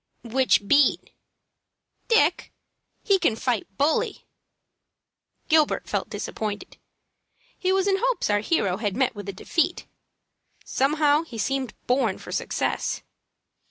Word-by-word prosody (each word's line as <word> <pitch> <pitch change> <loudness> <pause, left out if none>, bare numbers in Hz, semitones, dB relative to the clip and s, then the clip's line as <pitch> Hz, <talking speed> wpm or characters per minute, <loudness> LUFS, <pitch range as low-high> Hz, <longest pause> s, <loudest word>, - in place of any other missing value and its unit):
"Which 240 -3 +2
beat?" 285 +4 +3 1.0
"Dick. 455 -2 +2 0.5
He 395 -3 +3
can 230 - +2
fight 225 -5 -2
bully." 295 +3 0 1.2
Gilbert 315 -2 +2
felt - - -2
disappointed. 210 -1 -5 0.8
He 370 - +1
was 385 +1 +2
in 390 -1 +3
hopes - - 0
our 205 0 +2
hero 205 - 0
had 205 -1 -2
met 260 -1 +2
with 205 -2 -7
a - - -1
defeat. 330 - -1 0.8
Somehow 295 +2 +2
he 290 -9 -9
seemed 260 +2 -2
born 245 -6 +1
for - - -10
success. - - -2
265 Hz, 120 wpm, -25 LUFS, 215-320 Hz, 1.2 s, beat